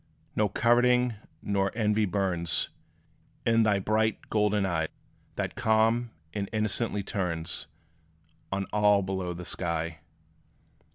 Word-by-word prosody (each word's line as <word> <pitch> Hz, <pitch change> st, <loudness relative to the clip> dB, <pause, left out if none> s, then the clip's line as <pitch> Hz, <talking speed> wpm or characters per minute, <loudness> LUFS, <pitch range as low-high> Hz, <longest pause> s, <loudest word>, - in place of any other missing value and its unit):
No 105 Hz, -1 st, +2 dB
coveting 125 Hz, +1 st, +3 dB, 0.3 s
nor 100 Hz, -1 st, +1 dB
envy 105 Hz, -1 st, +2 dB
burns 90 Hz, -4 st, 0 dB, 0.8 s
In 115 Hz, 0 st, +4 dB
thy 105 Hz, -2 st, +3 dB
bright 110 Hz, +2 st, 0 dB
golden 105 Hz, -2 st, +2 dB
eye, 80 Hz, -4 st, 0 dB, 0.5 s
That -, -, -2 dB
calm 110 Hz, +2 st, +2 dB, 0.2 s
and 100 Hz, -2 st, -3 dB
innocently 110 Hz, -1 st, 0 dB
turns 85 Hz, -5 st, -2 dB, 0.8 s
On 95 Hz, 0 st, -1 dB
all 105 Hz, -1 st, +4 dB
below 95 Hz, -2 st, -2 dB
the 90 Hz, +1 st, -7 dB
sky. 85 Hz, -2 st, -2 dB
105 Hz, 110 wpm, -28 LUFS, 95-110 Hz, 0.8 s, In